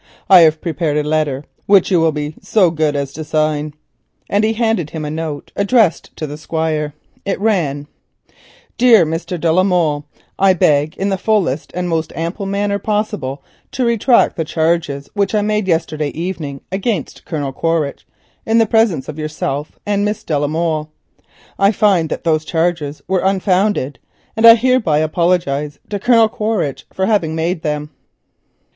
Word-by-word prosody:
I 185 - +10
have 160 -2 +4
prepared 160 -3 -1
a 150 0 -1
letter 150 -3 0 0.2
which 200 -1 +4
you 180 - +4
will 165 0 +3
be 150 0 -4
so 190 -6 +3
good 155 -2 0
as 140 -1 -3
to 155 - -6
sign," 155 -1 -1 0.6
and 205 +1 +2
he 220 +1 +2
handed 220 -8 0
him 155 -1 -5
a 150 - -4
note 155 -2 -5
addressed 200 -3 +2
to 155 - -4
the 150 0 -7
Squire. 155 -2 -2 0.3
It 195 - -2
ran: 165 -10 0 0.9
"Dear 235 -7 +6
Mr. 165 +2 -4
de 165 0 +1
la 180 +3 +4
Molle,— 165 -6 +1 0.3
"I 195 -1 +5
beg 150 -3 +2
in 195 +1 -1
the 195 -1 -1
fullest 185 -11 0
and 180 0 -2
most 165 -2 -1
ample 170 +5 -4
manner 200 +1 -1
possible 210 - -2 0.3
to 255 - 0
retract 235 +1 +3
the 165 - 0
charges 160 -3 -1
which 200 +1 0
I 210 - +2
made 210 -1 0
yesterday 160 -3 0
evening 160 -5 -5
against 190 - -3
Colonel 145 -5 -4
Quaritch, 165 -2 -2 0.4
in 225 +1 +1
the 225 - +5
presence 215 - +1
of 155 0 -7
yourself 150 -1 -4
and 205 -1 0
Miss 210 +1 -2
de 155 - -2
la 145 - 0
Molle. 155 0 -1 0.7
I 195 +1 +5
find 195 -7 +2
that - - -4
those 160 -2 +1
charges 160 -3 -2
were 185 0 +1
unfounded, 190 - +1 0.4
and 225 +1 +5
I 230 - +11
hereby 235 -9 +2
apologise 155 -3 0
to 205 - -2
Colonel 230 0 +4
Quaritch 215 -10 -2
for 190 - -1
having 180 -7 +1
made 165 +1 -1
them." 150 0 -3
165 Hz, 170 wpm, -17 LUFS, 150-200 Hz, 0.9 s, I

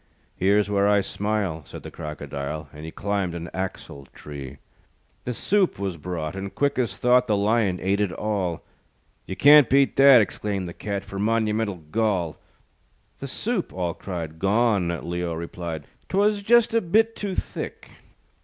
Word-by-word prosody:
"Here's 100 +2 +3
where 100 0 +2
I 105 0 +4
smile," 100 -5 -2
Said - - -10
the - - -8
Crocodile, 75 0 -6
And 75 +1 -9
he - - -5
climbed 100 -3 -2
an 85 -1 -6
axle 90 -7 -5
tree. 70 -3 -8 0.7
The 125 - -2
soup 200 - +1
was 95 -2 -3
brought, 80 0 -5
And 95 0 -6
quick 140 -2 +1
as 110 -6 -1
thought, 125 0 +4
The 105 -2 +2
Lion 100 -3 +1
ate 100 +2 0
it 105 -3 +1
all. 95 -5 -2 0.6
"You 95 - -4
can't 145 +1 +7
beat 135 0 +3
that," 135 -2 +9
Exclaimed 100 -2 -1
the 85 - -7
Cat, 100 0 -4
"For 100 -1 -7
monumental 105 -4 0
gall." 95 -7 0 0.8
"The - - -5
soup," - - -2
all 90 -2 -2
cried. 80 -4 -6
"Gone," 100 -4 +1
Leo 85 -1 -2
replied, 85 -2 -6 0.2
"'Twas 205 +1 +2
just 235 +2 +4
a 230 - +3
bit 220 +6 +2
too 200 -3 -4
thick." - - -5
100 Hz, 160 wpm, -24 LUFS, 85-115 Hz, 0.8 s, that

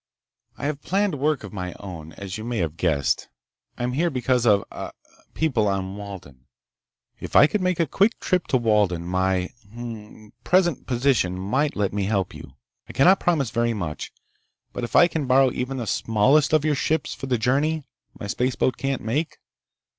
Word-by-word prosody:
"I - - -5
have 145 -1 -2
planned 195 +2 0
work 150 -1 +1
of - - -9
my 90 -3 -4
own, 80 -5 -8
as 100 -1 -7
you 110 - -6
may 120 0 -3
have 80 -5 -1
guessed. 75 -6 0 0.5
I - - -4
am 125 - 0
here 170 +6 +1
because 125 -3 +1
of... 100 -2 +4
ah... - - -7 0.4
people 130 -10 +1
on 95 -1 -2
Walden. 95 -11 -10 0.7
If - - -8
I - - +9
could 205 +6 0
make 185 -2 0
a 165 - +3
quick 200 - +1
trip 185 -2 0
to 130 - +2
Walden 105 -7 +1
my... 95 0 0 0.2
hm 115 - -11
m 120 -1 -5 0.2
m... 110 -1 -17
present 175 -4 +2
position 120 -8 +1
might 130 +11 0
let 100 -2 0
me 100 -1 -1
help 100 -2 -1
you. - - -11 0.4
I - - -8
cannot 185 +8 +5
promise 150 -9 +1
very 115 -1 0
much, 85 -7 -5 0.6
but - - -5
if 120 - -4
I 175 - +8
can 160 -5 -3
borrow 130 0 +5
even 130 +2 -3
the 120 - -3
smallest 115 +9 +2
of 155 -1 +3
your 155 - +3
ships 155 +3 0
for 135 - -7
the 125 -2 +1
journey 140 +7 +1 0.4
my - - -5
spaceboat 125 +4 0
can't 135 -1 -2
make 145 +9 -2
120 Hz, 190 wpm, -24 LUFS, 100-145 Hz, 0.7 s, I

